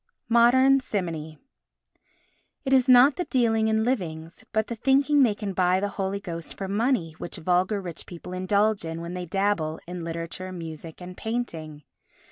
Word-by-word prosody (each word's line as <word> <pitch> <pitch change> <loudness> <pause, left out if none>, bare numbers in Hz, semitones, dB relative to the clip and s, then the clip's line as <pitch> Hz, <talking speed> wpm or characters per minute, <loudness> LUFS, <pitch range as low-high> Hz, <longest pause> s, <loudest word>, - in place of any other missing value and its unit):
Modern 260 +4 +5
Simony 165 - -4 1.3
It 270 - +1
is 260 -1 +4
not 255 +3 +7
the 355 - -1
dealing 225 -5 +2
in 220 0 +2
livings 170 -9 -3
but 220 0 +1
the 235 - -5
thinking 275 +4 +3
they 230 -6 +4
can 205 -2 -4
buy 185 0 +2
the 205 +1 -1
Holy 195 0 -3
Ghost 170 -4 -7
for 195 - -4
money 210 -3 0
which 175 - -6
vulgar 185 +4 +1
rich 175 -4 -8
people 180 +1 -9
indulge 200 +3 +1
in 165 0 -5
when 170 +1 -6
they 180 -1 -4
dabble 185 -4 0
in 175 0 -6
literature, 165 +3 -5
music 165 -1 -8
and 180 0 -9
painting. 165 -11 -4
195 Hz, 165 wpm, -26 LUFS, 170-235 Hz, 1.3 s, not